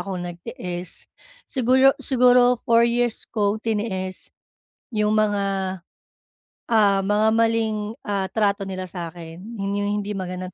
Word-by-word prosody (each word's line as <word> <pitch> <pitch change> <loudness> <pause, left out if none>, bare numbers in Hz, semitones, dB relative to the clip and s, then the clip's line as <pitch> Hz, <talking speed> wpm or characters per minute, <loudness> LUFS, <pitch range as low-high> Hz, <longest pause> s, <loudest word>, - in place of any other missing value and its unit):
akong 185 -3 -4
nagtiis. 175 0 -7 0.4
Siguro, 260 +1 +4
siguro 250 -1 +4
4 235 0 +4
years 240 -1 -1
kong 210 -1 0
tiniis 205 -4 -3 0.6
'yong 210 -1 +1
mga, 205 -2 +2 1.3
ah, 205 -4 +4
mga 210 +2 +2
maling, 225 -1 +2 0.3
ah, 195 -2 -1
trato 200 -2 0
nila 185 -1 -4
sa'kin. 170 -1 -8 0.2
'Yon 195 0 -2
'yong 205 0 -1
hindi 205 - -5
magandang 185 -1 -5
205 Hz, 120 wpm, -23 LUFS, 185-230 Hz, 1.3 s, Siguro